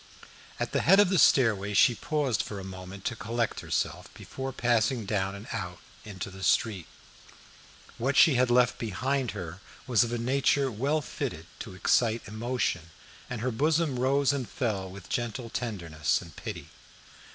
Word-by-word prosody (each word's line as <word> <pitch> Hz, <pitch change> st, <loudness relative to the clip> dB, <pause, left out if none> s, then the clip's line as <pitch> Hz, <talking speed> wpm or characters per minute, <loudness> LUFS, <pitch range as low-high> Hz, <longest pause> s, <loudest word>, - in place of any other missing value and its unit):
At -, -, -2 dB
the -, -, +1 dB
head 195 Hz, +4 st, +6 dB
of 205 Hz, -, +6 dB
the 185 Hz, -, +3 dB
stairway 105 Hz, -8 st, +4 dB
she 120 Hz, -, +6 dB
paused 135 Hz, -4 st, 0 dB
for 100 Hz, -, -6 dB
a -, -, -7 dB
moment 95 Hz, 0 st, -9 dB
to 120 Hz, -, -1 dB
collect 115 Hz, +2 st, -2 dB
herself -, -, -2 dB
before 135 Hz, 0 st, -6 dB
passing 120 Hz, -1 st, +1 dB
down 100 Hz, -1 st, -1 dB
and 100 Hz, +3 st, -10 dB
out 90 Hz, -6 st, -4 dB, 0.3 s
into 100 Hz, -2 st, -7 dB
the 95 Hz, 0 st, -11 dB
street. 95 Hz, 0 st, +1 dB, 1.1 s
What 135 Hz, +4 st, 0 dB
she 160 Hz, -, +7 dB
had 125 Hz, 0 st, +3 dB
left 125 Hz, 0 st, +3 dB
behind 125 Hz, +5 st, -1 dB
her 90 Hz, 0 st, -6 dB, 0.3 s
was 120 Hz, -6 st, +4 dB
of 120 Hz, -, -3 dB
a 120 Hz, -, -1 dB
nature 135 Hz, +2 st, +2 dB
well 140 Hz, +8 st, 0 dB
fitted -, -, -5 dB
to 95 Hz, -, -7 dB
excite 115 Hz, +5 st, +2 dB
emotion, 110 Hz, -6 st, -2 dB, 0.4 s
and 120 Hz, -3 st, -4 dB
her 125 Hz, +2 st, 0 dB
bosom 150 Hz, +1 st, +1 dB
rose 140 Hz, +2 st, +3 dB
and 130 Hz, -4 st, -3 dB
fell 100 Hz, -7 st, -2 dB
with 95 Hz, -1 st, -11 dB
a -, -, -16 dB
gentle 120 Hz, -1 st, -3 dB
tenderness 85 Hz, -10 st, -1 dB
and 85 Hz, -4 st, -12 dB
pity. -, -, -7 dB
115 Hz, 170 wpm, -28 LUFS, 100-130 Hz, 1.1 s, she